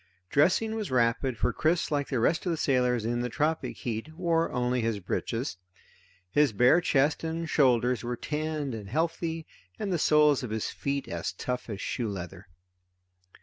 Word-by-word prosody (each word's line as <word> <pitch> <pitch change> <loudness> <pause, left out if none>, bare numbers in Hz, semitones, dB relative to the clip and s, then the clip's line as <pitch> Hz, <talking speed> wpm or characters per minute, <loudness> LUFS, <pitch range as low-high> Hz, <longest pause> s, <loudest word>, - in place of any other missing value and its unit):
Dressing 185 +9 +3
was 220 -2 -3
rapid, 125 0 +1
for - - 0
Chris, 160 +1 +1
like 145 -2 0
the 130 - -1
rest 160 +10 +1
of - - +2
the 165 - -1
sailors 125 -5 +1
in 120 +1 0
the 125 - -2
tropic 150 +8 -1
heat, 120 +5 -5
wore 165 -1 +1
only 125 0 0
his 115 -2 -1
breeches. 115 +5 -3 0.7
His 145 0 +3
bare 125 - +5
chest 145 -1 +2
and 165 +1 -3
shoulders 125 -5 +3
were 120 +1 -2
tanned 150 -2 -3
and 105 -3 -7
healthy 165 +3 -1 0.3
and 195 -3 -2
the 170 - 0
soles 150 -2 +4
of 125 - -5
his 110 0 -2
bare - - -6
feet 140 0 -1
as 85 +1 -3
tough 125 +6 -4
as 100 -3 -5
shoe 115 -3 -2
leather. 95 +1 -7
130 Hz, 180 wpm, -28 LUFS, 115-160 Hz, 0.7 s, bare